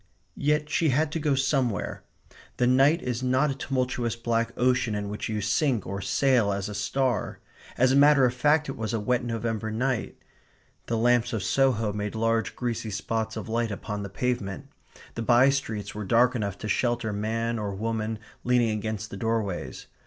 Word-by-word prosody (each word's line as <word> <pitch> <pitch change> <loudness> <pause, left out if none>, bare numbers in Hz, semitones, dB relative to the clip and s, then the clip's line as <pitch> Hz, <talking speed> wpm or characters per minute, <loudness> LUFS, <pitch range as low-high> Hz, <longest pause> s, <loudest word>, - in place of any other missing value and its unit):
Yet 150 +1 +2
she 160 +1 +1
had 150 +3 +1
to 165 - -2
go 145 -2 +1
somewhere. 135 -6 0 0.6
The 125 - +2
night 135 +7 +4
is 125 -1 -2
not 130 +3 +2
a - - -4
tumultuous 125 -4 -1
black 115 0 -1
ocean 125 -3 +2
in 100 -1 -3
which 105 +2 -4
you 105 -1 -2
sink 115 - +1
or 100 +1 -4
sail 125 -2 +2
as 100 0 -2
a 105 - -6
star. 125 +5 -1 0.4
As 130 +1 +4
a - - +3
matter 145 -1 +6
of 125 - +1
fact 150 +4 +2
it 135 - -4
was 110 0 -3
a - - 0
wet 120 +4 0
November 115 -2 -2
night. 125 +2 -2 0.7
The 115 - 0
lamps 120 +1 +2
of 110 -4 -2
Soho 115 -3 +2
made 105 +1 -4
large 115 0 0
greasy 120 -2 -3
spots 110 +2 -3
of 110 - -5
light 115 +1 0
upon 105 0 -5
the 100 - -5
pavement. 125 +3 -3 0.4
The 115 - -4
by 120 +4 +5
streets 110 -7 -3
were 105 - -5
dark 120 +5 +3
enough 100 -5 -3
to 110 - -6
shelter 120 0 0
man 115 +3 -1
or 100 -2 -3
woman 110 +1 -2 0.3
leaning 120 -2 +3
against 110 0 -4
the 100 - -6
doorways. 110 -4 -2
115 Hz, 185 wpm, -26 LUFS, 110-130 Hz, 0.7 s, matter